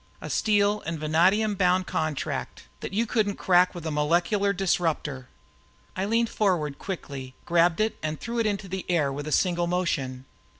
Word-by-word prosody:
A - - -6
steel 210 -1 +2
and 165 0 -2
vanadium 185 +8 +3
bound 185 -1 +2
contract 155 -4 -3 0.2
that - - -6
you 220 +4 +1
couldn't 210 -3 0
crack 180 0 +3
with 170 -2 -7
a 160 - -2
molecular 175 +7 +1
disruptor." 165 -8 -1 0.7
I 190 - -1
leaned 230 +2 +1
out 160 -8 +1
quickly, 140 -9 -6
grabbed 170 0 +3
it 215 +1 0
and 155 0 -3
threw 235 +1 -3
it 225 - +2
into 200 -1 -2
the 190 0 -4
air 150 -6 +1
with 145 +2 -5
a - - -4
single 175 +1 +2
motion. 140 -8 -2
180 Hz, 170 wpm, -26 LUFS, 155-200 Hz, 0.7 s, vanadium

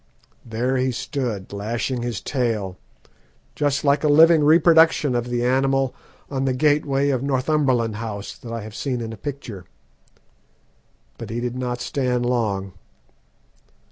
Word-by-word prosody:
There 120 +3 -1
he 130 0 +1
stood 120 - -4
lashing 115 +5 -2
his 120 -5 -3
tail, 115 -8 -2 0.8
just 145 -1 0
like 140 +1 +2
a - - +3
living 160 +1 +6
reproduction 160 -2 +5
of 120 0 -1
the 120 0 -1
animal 135 +1 +1 0.3
on 135 -1 -2
the 130 - +1
gateway 145 0 +2
of 130 -3 0
Northumberland 130 -5 +1
House 105 -3 -6
that 115 - -10
I 115 -1 -4
have 105 0 -9
seen 125 +2 -3
in 115 -1 -5
a - - -6
picture. 115 -6 -7 1.5
But - - -7
he 115 +2 -3
did 120 0 -3
not 125 -1 -3
stand 125 -1 -1
long. 105 -6 -1
125 Hz, 140 wpm, -22 LUFS, 115-140 Hz, 1.5 s, living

